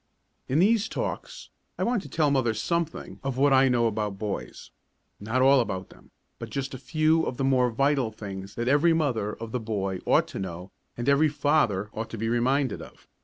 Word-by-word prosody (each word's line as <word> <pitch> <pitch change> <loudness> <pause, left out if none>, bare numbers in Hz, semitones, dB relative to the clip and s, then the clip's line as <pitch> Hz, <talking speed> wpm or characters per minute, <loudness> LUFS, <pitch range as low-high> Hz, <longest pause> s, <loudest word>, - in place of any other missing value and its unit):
In 130 - 0
these 220 +4 +3
talks - - -5 0.3
I - - -1
want 235 -3 +1
to - - -11
tell 150 -3 +1
mothers 120 -5 +1
something 170 +5 -2
of 135 -2 -3
what 140 +1 +4
I 135 0 +5
know 120 -2 +2
about 105 -3 -1
boys; 105 -1 -5 0.5
not 115 +5 0
all 135 +1 +6
about 95 -6 -3
them, - - -19 0.3
but 115 - -7
just 135 +3 -4
a 130 - -6
few 155 +3 +2
of 125 - -4
the 135 - -1
more 130 -2 +3
vital 135 0 +1
things 100 -2 -8
that 120 +1 -3
every 145 +5 +4
mother 120 -10 0
of 115 -1 -8
a 125 - 0
boy 100 -4 -3
ought - - +4
to - - -6
know 90 0 -6 0.3
and 120 - -4
every 140 +2 +4
father 140 -9 +1
ought 110 +1 -5
to 115 - -6
be 115 +1 -2
reminded 130 +2 +1
of. - - -14
125 Hz, 205 wpm, -26 LUFS, 110-145 Hz, 0.5 s, all